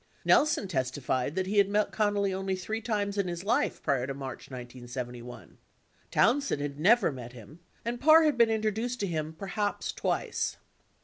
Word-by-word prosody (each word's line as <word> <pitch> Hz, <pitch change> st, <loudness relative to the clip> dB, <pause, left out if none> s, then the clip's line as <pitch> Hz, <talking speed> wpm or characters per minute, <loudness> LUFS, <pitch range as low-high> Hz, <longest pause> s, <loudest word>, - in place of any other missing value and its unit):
Nelson 300 Hz, -9 st, +4 dB
testified 130 Hz, -2 st, -1 dB
that 190 Hz, -1 st, 0 dB
he 205 Hz, +2 st, +2 dB
had 200 Hz, -1 st, +4 dB
met 210 Hz, +1 st, +1 dB
Connally 205 Hz, -2 st, +1 dB
only 190 Hz, 0 st, -2 dB
three 215 Hz, +5 st, -4 dB
times 205 Hz, -3 st, -1 dB
in 195 Hz, -, +1 dB
his 175 Hz, 0 st, -4 dB
life, 240 Hz, +8 st, 0 dB
prior 135 Hz, -4 st, +1 dB
to 135 Hz, -, -4 dB
March 135 Hz, -1 st, -7 dB
1971. 120 Hz, -1 st, -7 dB
58 -, -, -21 dB, 0.5 s
Townsend 280 Hz, -, +2 dB
had 145 Hz, 0 st, -5 dB
never 215 Hz, +2 st, +4 dB
met 120 Hz, -3 st, -8 dB
him 125 Hz, +7 st, -13 dB, 0.3 s
and 240 Hz, +1 st, -3 dB
Parr 315 Hz, +3 st, +7 dB
had 305 Hz, -3 st, +3 dB
been 235 Hz, -2 st, +5 dB
introduced 220 Hz, +3 st, -1 dB
to -, -, +1 dB
him 155 Hz, -4 st, -2 dB
perhaps 200 Hz, +4 st, -3 dB
twice. -, -, -2 dB
190 Hz, 175 wpm, -29 LUFS, 135-220 Hz, 0.5 s, Parr